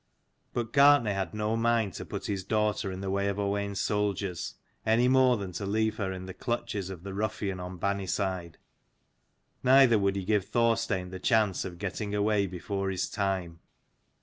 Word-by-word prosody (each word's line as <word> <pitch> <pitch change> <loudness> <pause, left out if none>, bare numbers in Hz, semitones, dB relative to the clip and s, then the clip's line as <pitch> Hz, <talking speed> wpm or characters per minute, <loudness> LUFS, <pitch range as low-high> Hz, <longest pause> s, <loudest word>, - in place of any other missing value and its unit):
But 120 -1 -3
Gartnaidh 140 -6 +6
had 95 -1 -3
no 105 +1 0
mind 115 -4 +1
to - - -6
put - - -6
his 100 -2 -2
daughter 105 -1 0
in 95 0 -6
the 95 -1 -2
way 100 0 0
of 100 0 -1
O 100 -1 0
wain's 100 -1 -2
soldiers, 100 -4 -1 0.3
any 115 +3 +3
more 130 -1 +5
than 100 -3 -5
to 100 +3 -4
leave 110 +1 0
her 95 -3 -2
in 95 0 -6
the 95 - -7
clutches 115 -3 -3
of 90 -3 -8
the 100 -1 -6
ruffian 105 -2 -2
on 90 0 -6
Banniside: 95 -2 -2 1.1
neither 130 -3 +6
would 100 0 +1
he 95 -2 -3
give 105 -1 +2
Thorstein 115 -4 +1
the 95 - -6
chance 110 -2 +2
of 90 -2 -7
getting 100 +2 -3
away 105 -1 +2
before 95 +2 -3
his 95 -1 -1
time. 95 -5 -2
100 Hz, 180 wpm, -29 LUFS, 95-110 Hz, 1.1 s, Gartnaidh